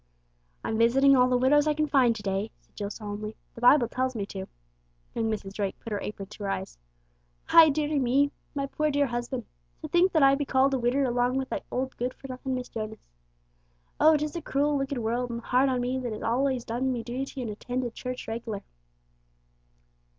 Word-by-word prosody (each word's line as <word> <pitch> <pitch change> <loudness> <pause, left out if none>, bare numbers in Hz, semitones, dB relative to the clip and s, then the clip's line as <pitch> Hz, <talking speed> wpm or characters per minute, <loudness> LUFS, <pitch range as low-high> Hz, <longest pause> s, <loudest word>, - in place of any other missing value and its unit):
"I'm 220 - -2
visiting 270 +4 +5
all 250 -1 +5
the 250 - +3
widows 290 +4 +4
I 300 - +2
can 305 0 +1
find 260 -6 +3
to 210 - -8
day," 195 +2 -1
said - - -35
Jill 205 -1 -4
solemnly. 210 0 -6 0.2
"The 230 - -11
Bible 245 0 +6
tells 255 +2 -2
me 205 -3 -2
to." 190 -1 -7 0.7
Young 225 -1 -1
Mrs. 200 -3 -4
Drake 200 -2 -3
put 230 - -9
her 205 - -2
apron 200 -2 -6
to 210 - -9
her 200 - -2
eyes. - - -4 0.7
"Aye, 325 -1 +8
dearie 300 0 0
me! 275 +3 +2 0.2
My 275 -1 -1
poor, 305 +2 -1
dear 285 0 +2
husban'! 240 -1 -3 0.4
To - - -3
think 350 +4 +3
that 315 -4 +4
I 275 0 +7
be 280 +1 0
called 270 0 +2
a 265 - +1
widder 245 +4 +1
along 245 0 +1
wi' 265 - 0
that - - -3
old 260 +1 -3
good 250 +1 -2
for 270 - -11
nothin' 260 0 -4
Mrs. 250 -1 -5
Jonas! 220 -1 -6 0.9
Oh, 310 0 +6
'tis 300 +1 -3
a 340 - -3
cruel, 290 0 +1
wicked 275 0 -1
world, 240 +2 -1
and 235 0 -4
hard 255 +3 +2
on 255 -1 0
me 250 +2 -1
that 245 -3 -3
has 215 - -6
allays 255 +1 0
done 250 +3 -1
me 240 -2 -3
duty 260 +4 -5
an' 230 - -4
attended 245 +3 -4
church 250 +1 -6
reg'lar!" 225 -2 -4
250 Hz, 210 wpm, -27 LUFS, 225-275 Hz, 0.9 s, Aye